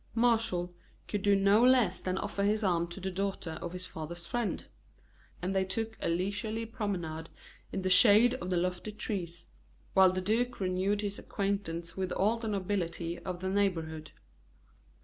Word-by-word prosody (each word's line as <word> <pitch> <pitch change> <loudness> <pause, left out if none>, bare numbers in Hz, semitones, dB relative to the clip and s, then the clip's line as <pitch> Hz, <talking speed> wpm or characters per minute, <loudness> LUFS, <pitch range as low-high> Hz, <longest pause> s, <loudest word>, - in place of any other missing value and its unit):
Martial 225 -7 +2 0.3
could 205 - -2
do 205 0 +4
no 200 +3 +5
less 245 -7 +4
than 185 0 -2
offer 200 0 -2
his 210 +2 +2
arm 170 -3 +2
to 175 +3 -9
the 190 0 -3
daughter 190 -4 -3
of 170 - -4
his 180 0 -4
father's 170 +1 -6
friend; 240 +1 -2 0.8
and 190 +2 -1
they 190 - +3
took 220 +4 -3
a - - 0
leisurely 205 +6 -1
promenade 175 -8 -4 0.4
in 190 - -3
the 185 - +1
shade 215 +5 +7
of 180 - -4
the 180 - +1
lofty 180 +4 -1
trees, 180 -5 -4 0.5
while 190 -1 +7
the 185 - -1
duke 230 +6 0
renewed 190 +2 0
his 205 -1 -3
acquaintance 195 -4 -3
with 185 -1 -2
all 220 +4 +2
the 225 - -4
nobility 180 -4 -2
of 180 -2 -5
the 185 - -2
neighborhood. 165 -6 -1
190 Hz, 170 wpm, -31 LUFS, 175-210 Hz, 0.8 s, shade